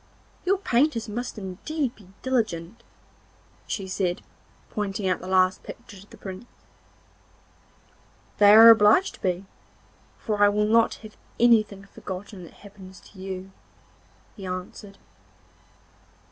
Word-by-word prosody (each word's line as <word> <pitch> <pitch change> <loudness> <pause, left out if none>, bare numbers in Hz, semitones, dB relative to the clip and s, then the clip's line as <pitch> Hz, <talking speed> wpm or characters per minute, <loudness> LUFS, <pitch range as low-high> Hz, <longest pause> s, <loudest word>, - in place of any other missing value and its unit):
'Your 390 +2 +2
painters 250 - +1
must 240 +3 -5
indeed 235 - -4
be 200 - -19 0.2
diligent,' 220 -7 -2 0.9
she 195 -2 -4
said, 185 -2 -2 0.5
pointing 200 -2 -3
out 185 -2 0
the 185 - -9
last 185 0 +2
picture 235 -4 -12
to 200 - -17
the - - -15
Prince. 190 +3 -9 1.9
'They 205 0 +7
are 225 +2 +10
obliged 220 - +4
to - - -16
be, 185 -1 -2 0.7
for 210 -2 -1
I 205 - +7
will 210 +1 +1
not 225 +1 +3
have 215 - -12 0.2
anything 215 -4 +3
forgotten 190 0 -9
that - - -15
happens 190 -2 -13
to 195 - -16
you,' 190 0 -7 0.8
he 200 - -11
answered. 185 +2 -7
205 Hz, 125 wpm, -25 LUFS, 190-225 Hz, 1.9 s, are